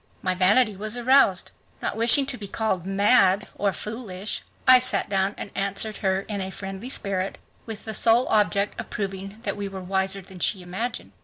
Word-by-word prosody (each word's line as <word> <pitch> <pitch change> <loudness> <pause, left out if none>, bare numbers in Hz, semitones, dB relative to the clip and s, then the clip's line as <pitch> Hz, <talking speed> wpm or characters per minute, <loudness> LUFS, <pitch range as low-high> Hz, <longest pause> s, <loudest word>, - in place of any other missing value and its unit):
My 185 - +1
vanity 205 +4 +3
was 215 +4 -3
aroused. 245 -6 +3 0.3
Not - - -3
wishing 235 +5 +4
to 265 - -3
be 205 - -6
called 190 -5 -2
"mad" 195 0 +3
or 200 -1 0
"foolish" 210 -2 -4 0.3
I 255 0 +9
sat 250 - +2
down 195 0 +1
and - - -6
answered 200 +2 -2
her 190 -1 0
in 200 0 -4
a 190 - -2
friendly 195 +4 -7
spirit, 195 -6 -2 0.3
with 220 -2 -7
the 220 - -4
sole 230 +3 +4
object 200 -1 +1
of - - -6
proving 195 +1 -5
that 200 -4 -2
we 205 -1 -4
were 190 -1 -8
wiser 190 +1 -1
than 185 0 -13
she 185 +1 0
imagined. 190 - -4
200 Hz, 185 wpm, -24 LUFS, 190-220 Hz, 0.3 s, I